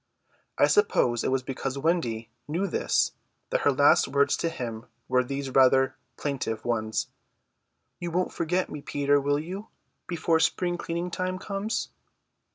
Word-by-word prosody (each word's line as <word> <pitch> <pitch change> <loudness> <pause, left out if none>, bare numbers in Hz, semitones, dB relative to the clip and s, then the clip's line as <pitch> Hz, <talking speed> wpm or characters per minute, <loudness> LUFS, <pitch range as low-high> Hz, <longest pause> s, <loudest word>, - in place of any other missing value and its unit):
I - - +6
suppose 125 - +3
it - - +1
was 130 -1 0
because 135 0 -4
Wendy 120 -8 0 0.2
knew 170 +6 -1
this 190 - +1 0.4
that - - +1
her 145 - +4
last 140 +1 +5
words 140 +1 +2
to 165 - 0
him 120 -7 -6 0.2
were 125 0 +3
these 135 +1 -4
rather 130 0 +5 0.2
plaintive 130 -6 -3
ones: 110 -1 -1 0.9
"You 175 - -3
won't 180 +2 -1
forget 180 +3 0
me, 150 - -6
Peter, 145 0 +1
will 145 +1 +1
you, 185 +8 -6 0.4
before 165 -1 +1
spring 175 +2 +1
cleaning 170 +1 -3
time 185 +1 -2
comes?" 200 +3 -3
145 Hz, 150 wpm, -27 LUFS, 130-175 Hz, 0.9 s, I